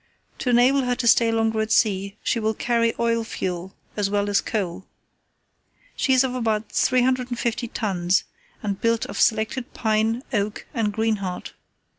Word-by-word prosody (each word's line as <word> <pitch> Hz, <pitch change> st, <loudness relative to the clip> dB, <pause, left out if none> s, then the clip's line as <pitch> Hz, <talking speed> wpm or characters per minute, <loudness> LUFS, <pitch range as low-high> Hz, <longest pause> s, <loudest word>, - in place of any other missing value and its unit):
To 250 Hz, -, -1 dB
enable 250 Hz, +3 st, +4 dB
her 245 Hz, 0 st, +1 dB
to 240 Hz, -1 st, -2 dB
stay 230 Hz, 0 st, +5 dB
longer 225 Hz, -1 st, +1 dB
at 220 Hz, 0 st, -3 dB
sea, 200 Hz, -2 st, +1 dB
she 235 Hz, -, 0 dB
will 220 Hz, 0 st, 0 dB
carry 230 Hz, 0 st, +1 dB
oil 230 Hz, -1 st, +1 dB
fuel 185 Hz, -4 st, -4 dB, 0.2 s
as 205 Hz, -2 st, 0 dB
well 205 Hz, 0 st, 0 dB
as 200 Hz, -, +3 dB
coal. 190 Hz, -4 st, -3 dB, 1.1 s
She 270 Hz, -, 0 dB
is 260 Hz, 0 st, +5 dB
of 260 Hz, -1 st, -2 dB
about 225 Hz, -3 st, -1 dB
350 250 Hz, -2 st, +1 dB
tons, 190 Hz, -5 st, 0 dB, 0.4 s
and 200 Hz, -2 st, -3 dB
built 230 Hz, 0 st, +1 dB
of -, -, -4 dB
selected 220 Hz, +3 st, 0 dB
pine, 220 Hz, +2 st, +1 dB
oak, 205 Hz, -1 st, -1 dB
and 225 Hz, -5 st, 0 dB
greenheart. 205 Hz, -4 st, -2 dB
225 Hz, 155 wpm, -23 LUFS, 205-240 Hz, 1.1 s, stay